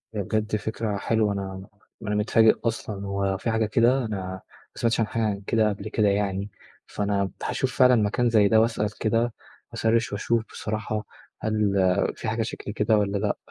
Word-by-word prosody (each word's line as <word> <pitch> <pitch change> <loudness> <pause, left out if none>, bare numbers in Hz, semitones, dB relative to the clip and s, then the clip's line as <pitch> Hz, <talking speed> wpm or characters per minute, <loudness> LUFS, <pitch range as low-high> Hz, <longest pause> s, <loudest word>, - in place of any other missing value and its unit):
هي 105 - -1
بجد 110 +2 -1
فكرة 110 0 -2
حلوة. 110 0 +1
أنا 95 -1 -5 0.3
أنا 105 -1 -2
متفاجئ 110 +1 +4
أصلًا، 110 -3 -3
هو 100 -1 -1
في 115 - -2
حاجة 110 0 +1
كده؟ 120 +4 +3
أنا 110 -2 -3
ما 95 0 -6 0.3
سمعتش 115 0 0
عن 115 - +2
حاجة 105 -3 -1
كده 110 -2 +3
قبل 100 +1 -5
كده 110 -1 +2
يعني. 100 0 0 0.4
فأنا 100 -1 -1
هاشوف 130 -1 -1
فعلًا 125 -1 +6
مكان 115 +2 +2
زي 110 -3 +5
ده، 110 +2 +5
وأسأل 110 -2 -1
كده، 115 +1 +1 0.4
هاسرِّش 115 +1 +1
وأشوف 115 +2 0
بصراحة، 110 0 -3 0.4
هل 105 -2 +1 0.4
في - - -6
حاجة 115 +1 0
شكل 110 -2 -6
كده 105 +1 +2
والّا 100 -1 0
لأ؟ 100 0 -1
110 Hz, 175 wpm, -25 LUFS, 100-115 Hz, 0.4 s, فعلًا